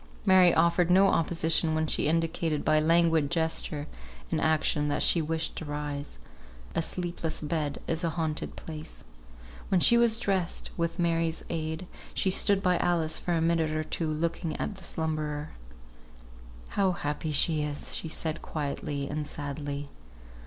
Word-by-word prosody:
Mary 185 -3 +7
offered 170 +1 +3
no 190 +2 +6
opposition 165 -1 +1
when 160 0 +1
she 150 - +1
indicated 165 -1 0
by 155 0 +4
languid 165 -2 +3
gesture 160 -2 -1 0.5
and 160 - 0
action 155 -1 +2
that 145 - 0
she 170 - +4
wished 160 +1 -1
to - - -5
rise. 145 - -5 0.6
A - - +1
sleepless 170 -1 -3
bed 150 -2 -2
is 165 +1 -2
a 170 - +2
haunted 160 -1 -2
place. 155 -1 -8 0.7
When 190 - +3
she 235 +7 +6
was 235 -2 +4
dressed 195 -6 -2
with 170 0 -1
Mary's 165 -2 0
help, 160 0 -2 0.3
she 190 - +2
stood 195 +1 +3
by 180 -1 +3
Alice 165 -3 +1
for 175 - -2
a 165 - +1
minute 165 -1 +2
or 155 - 0
two, 160 +1 -2
looking 160 +1 -2
at 205 - -3
the 190 - -13
slumberer. 155 -2 -3 1.2
"How 195 -2 +1
happy 150 -1 -3
she 155 +1 +2
is!" 150 -1 -3 0.3
said 160 0 -2
she, - - -15
quietly 145 -1 -3
and 150 +1 -3
sadly. 145 -1 -5
160 Hz, 155 wpm, -28 LUFS, 150-170 Hz, 1.2 s, Mary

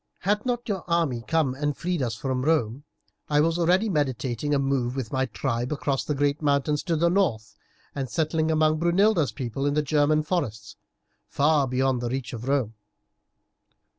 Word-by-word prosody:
"Had 210 +5 0
not 240 -1 -2
your 200 -4 -2
army 165 -9 0
come 160 -6 +1
and 145 +1 -2
freed 175 -2 -2
us 115 -3 -1
from 130 -1 -2
Rome 140 -3 0 0.4
I 150 -1 +3
was 165 +3 +2
already 180 +6 +3
meditating 135 - -1
moving 135 -3 0
with 130 -5 -4
my 130 0 0
tribe 120 +1 -2
across 140 -2 -1
the 150 - -2
great 145 +1 0
mountains 145 0 +1
to 170 -3 0
the 165 +2 +2
north 155 - 0 0.4
and 135 -3 -4
settling 160 0 0
among 155 0 +2
Brunilda's 175 -1 +3
people 135 +1 -3
in 145 - 0
the 150 - +2
German 150 +1 +2
forests, 120 - -3 0.5
far 145 -1 +2
beyond 130 0 0
the 120 - -2
reach 130 0 -4
of 120 +1 -6
Rome. 135 -6 0
145 Hz, 170 wpm, -25 LUFS, 130-160 Hz, 0.5 s, I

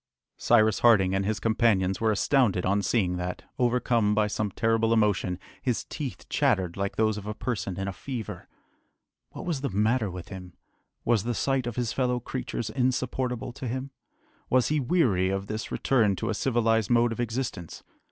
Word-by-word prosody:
Cyrus 110 -3 +3
Harding 100 -6 +5
and 95 0 0
his 110 -1 -1
companions 110 -5 +2
were 110 -1 +3
astounded 105 -4 +2
on 100 +2 +2
seeing 95 -5 +1
that, 90 0 -4 0.2
overcome 120 -3 +2
by 110 0 +3
some 105 0 -2
terrible 115 +3 +1
emotion, 105 -5 +1 0.2
his 125 -3 -1
teeth 140 -5 -6
chattered 95 - +1
like 100 0 -2
those 110 -1 +1
of 105 - -10
a 105 - -4
person 100 -7 -3
in 95 - -2
a 100 - -3
fever. 120 +3 -6 0.8
What - - -8
was 165 -6 -2
the 140 - -1
matter 110 +2 +1
with 90 -1 -8
him? 90 -2 -9 0.5
Was 115 -4 +2
the 120 0 -2
sight 135 -1 0
of 120 - -4
his 120 -3 -1
fellow 125 -2 0
creatures 120 -2 -4
insupportable 125 -1 -1
to 130 - -6
him? 130 +3 -4 0.6
Was 130 -1 +3
he 150 0 +1
weary 120 - +2
of 95 0 -2
this 110 +2 -5
return 110 -7 +2
to - - -2
a - - 0
civilised 115 -2 +1
mode 120 0 +3
of 115 - -5
existence? 115 - -4
115 Hz, 180 wpm, -27 LUFS, 100-125 Hz, 0.8 s, Harding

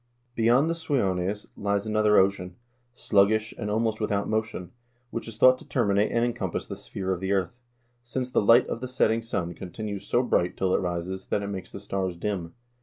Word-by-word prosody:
" 120 0 -43
Beyond 120 +6 +4
the 165 - +1
Suiones 105 - -1
lies 100 0 -1
another 105 -1 +3
ocean, 95 -2 +2 0.4
sluggish, 110 0 +2
and 105 - -4
almost 110 +1 0
without 100 -1 0
motion, 110 -4 -2 0.4
which 115 - -5
is 115 -2 -8
thought 130 +2 +6
to - - -15
terminate 105 -4 +1
and 115 0 +2
encompass 120 - -3
the - - -6
sphere 95 -1 -4
of 90 - -4
the 95 +1 -2
earth, 95 +5 -2 0.4
since 125 +1 -4
the - - +3
light 115 +4 +6
of 115 - -4
the 130 - -3
setting 115 -3 +1
sun 100 -7 -3
continues 100 +3 -6
so 120 - +2
bright 90 -7 +1
till 95 -1 +1
it - - +3
rises, 90 +1 -4
that 100 - -1
it 100 - -4
makes 95 -2 -6
the - - -7
stars 95 -2 -3
dim." 90 -3 -3
105 Hz, 200 wpm, -26 LUFS, 95-115 Hz, 0.4 s, thought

